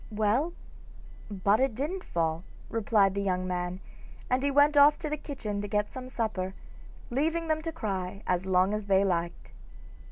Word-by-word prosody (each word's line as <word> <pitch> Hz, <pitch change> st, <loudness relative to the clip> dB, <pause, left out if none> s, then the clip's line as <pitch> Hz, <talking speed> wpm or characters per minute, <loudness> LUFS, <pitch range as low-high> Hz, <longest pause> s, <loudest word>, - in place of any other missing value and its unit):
'Well, 220 Hz, +10 st, +1 dB, 0.8 s
but 200 Hz, +1 st, +2 dB
it 265 Hz, -3 st, +1 dB
didn't 315 Hz, -, -3 dB
fall,' 165 Hz, 0 st, -1 dB, 0.3 s
replied 210 Hz, -3 st, +2 dB
the 200 Hz, -, -1 dB
young 185 Hz, -2 st, 0 dB
man, 180 Hz, 0 st, -3 dB, 0.5 s
and 255 Hz, +1 st, +3 dB
he 280 Hz, -, +1 dB
went 290 Hz, +2 st, +4 dB
off 290 Hz, +1 st, +7 dB
to 310 Hz, -, -4 dB
the -, -, +1 dB
kitchen 215 Hz, -9 st, -5 dB
to 205 Hz, -, -4 dB
get 210 Hz, 0 st, -1 dB
some 255 Hz, -1 st, -7 dB
supper, 200 Hz, -6 st, -2 dB, 0.6 s
leaving 325 Hz, +6 st, 0 dB
them 315 Hz, 0 st, +1 dB
to 330 Hz, +1 st, -4 dB
cry 195 Hz, -, -4 dB
as 180 Hz, 0 st, 0 dB
long 185 Hz, +2 st, +3 dB
as 210 Hz, -1 st, -2 dB
they 195 Hz, 0 st, +4 dB
liked. 175 Hz, -2 st, -2 dB
210 Hz, 170 wpm, -29 LUFS, 185-280 Hz, 0.8 s, off